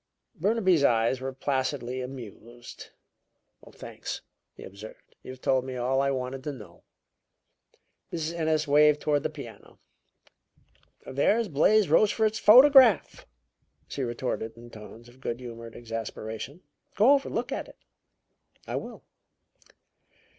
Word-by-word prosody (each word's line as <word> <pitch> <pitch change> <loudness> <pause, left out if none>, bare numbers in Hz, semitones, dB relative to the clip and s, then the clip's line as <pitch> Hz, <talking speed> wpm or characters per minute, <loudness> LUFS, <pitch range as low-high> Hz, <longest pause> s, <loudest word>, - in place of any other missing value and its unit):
Burnaby's 190 -4 +2
eyes 120 0 +2
were 135 0 -4
placidly 130 -1 -2
amused. 120 -2 -10 0.8
"Thanks," - - -8 0.3
he - - -12
observed. 100 +3 -12
"You've 130 0 -11
told 130 -1 +1
me 130 0 -6
all 130 +2 0
I 140 - +1
wanted 130 0 -4
to 150 - -2
know." 125 -7 -13 1.3
Mrs. 165 -1 -3
Ennis 160 -2 0
waved 150 +1 +5
toward 145 -1 0
the - - -2
piano. - - -12 1.3
"There's 205 - +1
Blais 195 +7 +3
Rochefort's 215 +6 +2
photograph," 255 - +6 0.6
she 140 - -5
retorted 120 -2 -4
in 120 0 -13
tones 110 +2 -12
of 125 +2 -19
good 120 -2 -4
humored 115 -2 -9
exasperation. 115 - -7 0.3
"Go 220 +7 +5
over 275 -1 +1
and - - -7
look - - -2
at - - -4
it." - - -16 0.9
"I - - -4
will." - - -8
135 Hz, 125 wpm, -27 LUFS, 120-165 Hz, 1.3 s, photograph